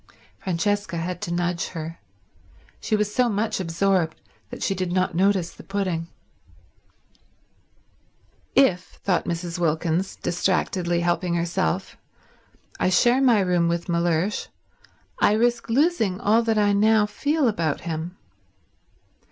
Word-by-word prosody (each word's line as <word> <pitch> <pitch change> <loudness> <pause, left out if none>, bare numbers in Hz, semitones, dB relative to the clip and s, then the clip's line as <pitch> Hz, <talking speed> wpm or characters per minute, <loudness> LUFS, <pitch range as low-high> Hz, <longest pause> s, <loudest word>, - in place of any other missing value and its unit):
Francesca 190 +1 -1
had 175 +1 -4
to 170 - -4
nudge 175 0 -1
her. 165 +1 -6 0.8
She 215 - 0
was 210 0 -1
so 250 0 +2
much 210 0 -1
absorbed 175 -1 0 0.3
that - - -7
she - - +1
did 185 -2 -3
not 185 -1 +1
notice 185 0 +2
the - - -13
pudding. 185 -4 -2 2.5
"If," 190 -10 +2
thought 190 -3 +1
Mrs. 170 +1 -3
Wilkins, 165 +2 0
distractedly 175 -1 0
helping 175 0 0
herself, 170 - -1 0.8
"I - - +2
share 240 +8 +4
my 240 -6 +5
room 180 -2 +2
with 170 0 -1
Mellersh 170 +3 0 0.7
I - - +4
risk 235 +1 +1
losing 230 - +2
all 220 +3 +3
I 210 -2 +3
now 215 +1 +4
feel 290 +6 0
about 165 -9 -1
him. 165 +2 -5
185 Hz, 120 wpm, -24 LUFS, 170-210 Hz, 2.5 s, my